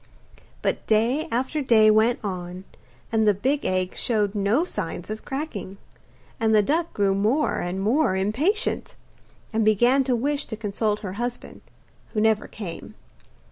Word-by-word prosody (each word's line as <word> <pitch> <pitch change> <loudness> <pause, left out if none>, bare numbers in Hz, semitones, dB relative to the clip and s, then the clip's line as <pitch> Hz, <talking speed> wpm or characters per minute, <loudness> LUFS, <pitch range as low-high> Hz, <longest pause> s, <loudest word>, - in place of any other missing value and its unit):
But - - -1
day 230 +8 +2
after 260 +6 -1
day 220 -5 +5
went 220 +3 +3
on, 180 -2 -5 0.5
and 220 -1 +2
the 205 - +5
big 270 +8 0
egg 185 0 -1
showed 210 -4 0
no 210 +8 +2
signs 180 - -5
of 215 - -6
cracking, 265 - -5 0.6
and 220 -1 +3
the 210 - +5
duck 325 - 0
grew 200 -1 +1
more 220 +10 +1
and 175 +2 -3
more 220 +2 +2
impatient, 275 - -1 0.6
and 220 0 +2
began 240 +6 +4
to 250 -2 +2
wish 285 +4 -1
to 220 - -6
consult 210 0 -1
her 185 -3 -5
husband, 245 0 -5 0.5
who 215 - 0
never 220 0 +2
came. 185 -6 -8
220 Hz, 150 wpm, -24 LUFS, 200-255 Hz, 0.6 s, day